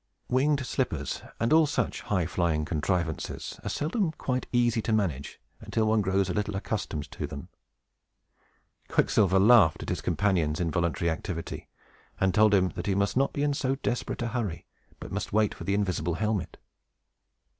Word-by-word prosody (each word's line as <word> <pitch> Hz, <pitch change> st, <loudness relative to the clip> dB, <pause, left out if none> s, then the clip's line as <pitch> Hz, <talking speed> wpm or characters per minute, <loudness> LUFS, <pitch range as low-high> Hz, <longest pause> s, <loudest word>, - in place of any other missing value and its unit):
Winged 140 Hz, +2 st, +2 dB
slippers, 80 Hz, -, -2 dB, 0.2 s
and 115 Hz, +5 st, +2 dB
all 160 Hz, -1 st, +6 dB
such 130 Hz, -4 st, -1 dB
high 95 Hz, -5 st, 0 dB
flying 80 Hz, -3 st, 0 dB
contrivances, 80 Hz, 0 st, -2 dB
are -, -, -3 dB
seldom 170 Hz, +4 st, 0 dB
quite 130 Hz, -4 st, -2 dB
easy 120 Hz, -2 st, +2 dB
to 110 Hz, -, -2 dB
manage 85 Hz, -11 st, -1 dB, 0.2 s
until 110 Hz, -, -1 dB
one 110 Hz, 0 st, +3 dB
grows 95 Hz, 0 st, +1 dB
a 90 Hz, -, -2 dB
little 105 Hz, +1 st, -2 dB
accustomed 80 Hz, -8 st, -3 dB
to -, -, -4 dB
them. 70 Hz, -1 st, -8 dB, 1.4 s
Quicksilver 95 Hz, -2 st, +3 dB
laughed 100 Hz, -5 st, +6 dB
at -, -, -6 dB
his -, -, -2 dB
companion's 85 Hz, -7 st, +1 dB
involuntary 85 Hz, 0 st, 0 dB
activity, 85 Hz, +1 st, -5 dB, 0.5 s
and 95 Hz, -1 st, +2 dB
told 105 Hz, -1 st, +5 dB
him 95 Hz, -1 st, +3 dB
that 90 Hz, +1 st, -6 dB
he 95 Hz, -, +1 dB
must 100 Hz, +1 st, +1 dB
not 135 Hz, +2 st, +2 dB
be 145 Hz, -, -2 dB
in 145 Hz, -1 st, +2 dB
so 135 Hz, -1 st, 0 dB
desperate 125 Hz, -2 st, -3 dB
a 120 Hz, -, -1 dB
hurry, 110 Hz, -8 st, -3 dB, 0.3 s
but -, -, -8 dB
must -, -, -3 dB
wait 105 Hz, -1 st, +3 dB
for -, -, -9 dB
the 100 Hz, -, +1 dB
invisible 90 Hz, -5 st, 0 dB
helmet. 105 Hz, -1 st, -2 dB
100 Hz, 165 wpm, -28 LUFS, 85-120 Hz, 1.4 s, all